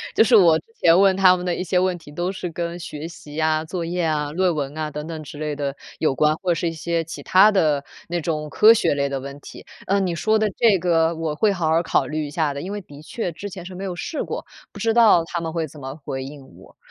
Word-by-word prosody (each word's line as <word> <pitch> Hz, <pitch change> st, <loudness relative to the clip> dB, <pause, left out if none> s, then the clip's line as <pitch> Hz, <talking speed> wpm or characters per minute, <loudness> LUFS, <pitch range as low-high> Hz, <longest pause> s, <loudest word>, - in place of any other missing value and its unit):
就 -, -, +6 dB
是 235 Hz, +1 st, +4 dB
我 170 Hz, -6 st, +6 dB
之 -, -, -21 dB
前 165 Hz, 0 st, +5 dB
问 195 Hz, -1 st, +4 dB
他 185 Hz, -1 st, +6 dB
们 180 Hz, -, -5 dB
的 180 Hz, -1 st, -1 dB
一 -, -, -3 dB
些 180 Hz, 0 st, +1 dB
问 185 Hz, -1 st, 0 dB
题， 155 Hz, -3 st, -14 dB
都 175 Hz, +5 st, -2 dB
是 185 Hz, -2 st, -5 dB
跟 170 Hz, +1 st, -4 dB
学 155 Hz, -2 st, -7 dB
习 165 Hz, -3 st, -12 dB
呀、 155 Hz, 0 st, 0 dB
作 175 Hz, +1 st, -4 dB
业 175 Hz, +1 st, -2 dB
啊， 150 Hz, -2 st, -1 dB
论 180 Hz, +2 st, +1 dB
文 145 Hz, 0 st, -4 dB
啊， 155 Hz, -1 st, -3 dB
等 150 Hz, +1 st, -6 dB
等 160 Hz, -2 st, -6 dB
之 145 Hz, 0 st, -10 dB
类 150 Hz, -1 st, -3 dB
的 140 Hz, -1 st, -3 dB, 0.2 s
有 155 Hz, -, +1 dB
关， 150 Hz, +3 st, +2 dB
或 180 Hz, +2 st, -2 dB
者 -, -, +4 dB
是 170 Hz, +1 st, -1 dB
一 -, -, -4 dB
些 165 Hz, +1 st, -2 dB
其 155 Hz, -3 st, -9 dB
它 195 Hz, +7 st, +6 dB
的 155 Hz, -8 st, +2 dB, 0.3 s
那 175 Hz, 0 st, -1 dB
种 155 Hz, -1 st, -2 dB
科 215 Hz, -, +7 dB
学 230 Hz, -, +3 dB
类 140 Hz, 0 st, -1 dB
的 135 Hz, -1 st, -3 dB
问 140 Hz, +1 st, -8 dB
题。 -, -, -12 dB, 0.2 s
呃， 200 Hz, +1 st, +2 dB
你 185 Hz, -3 st, 0 dB
说 215 Hz, +6 st, +1 dB
的 215 Hz, 0 st, +1 dB
这 225 Hz, -5 st, +4 dB
个 165 Hz, -2 st, +2 dB
我 160 Hz, -1 st, -2 dB
会 205 Hz, +7 st, +2 dB
好 175 Hz, -5 st, -1 dB
好 165 Hz, +1 st, +3 dB
考 170 Hz, -, +1 dB
虑 155 Hz, -1 st, -3 dB
一 -, -, -8 dB
下 150 Hz, -1 st, -1 dB
的， 140 Hz, -, -5 dB
因 185 Hz, -, -6 dB
为 205 Hz, -, -4 dB
的 145 Hz, -5 st, -14 dB
确 180 Hz, +4 st, -4 dB
之 200 Hz, +5 st, -7 dB
前 180 Hz, -2 st, -9 dB
是 185 Hz, -, -8 dB
没 185 Hz, +2 st, -7 dB
有 185 Hz, -2 st, -4 dB
试 300 Hz, -, -4 dB
过， -, -, -5 dB, 0.3 s
不 -, -, -13 dB
知 225 Hz, 0 st, +1 dB
道 220 Hz, -7 st, +6 dB
它 170 Hz, 0 st, -4 dB
们 165 Hz, -1 st, -4 dB
会 165 Hz, -1 st, -2 dB
怎 150 Hz, +1 st, -14 dB
么 135 Hz, 0 st, -7 dB
回 135 Hz, 0 st, -4 dB
应 140 Hz, 0 st, -10 dB
我。 -, -, -18 dB
165 Hz, 300 characters per minute, -22 LUFS, 150-185 Hz, 0.3 s, 科